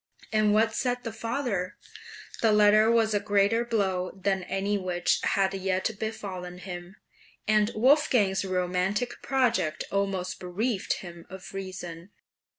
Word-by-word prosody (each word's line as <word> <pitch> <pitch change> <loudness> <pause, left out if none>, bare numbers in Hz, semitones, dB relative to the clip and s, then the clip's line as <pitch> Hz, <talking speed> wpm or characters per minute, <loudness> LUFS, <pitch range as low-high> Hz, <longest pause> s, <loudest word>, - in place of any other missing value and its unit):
And 215 -1 +3
what 220 +1 +3
said 245 0 -1
the 230 - -5
father? 225 -6 -2 0.6
This 225 - +4
letter 210 +1 +5
was 225 -2 +3
a 205 - +3
greater 205 +2 +2
blow 190 -6 0
than 190 0 0
any 195 +2 -1
which 180 -3 0
had 195 -1 +1
yet 190 +1 0
befallen 185 -5 -5
him, 180 0 -8 0.5
and 215 0 +3
Wolfgang's 230 -6 +3
romantic 185 +5 -1
project 245 - +1
almost 195 -2 -1
bereft 195 +4 -2
him 170 -1 -10
of 190 0 -10
reason. 185 -2 -7
200 Hz, 130 wpm, -27 LUFS, 185-220 Hz, 0.6 s, letter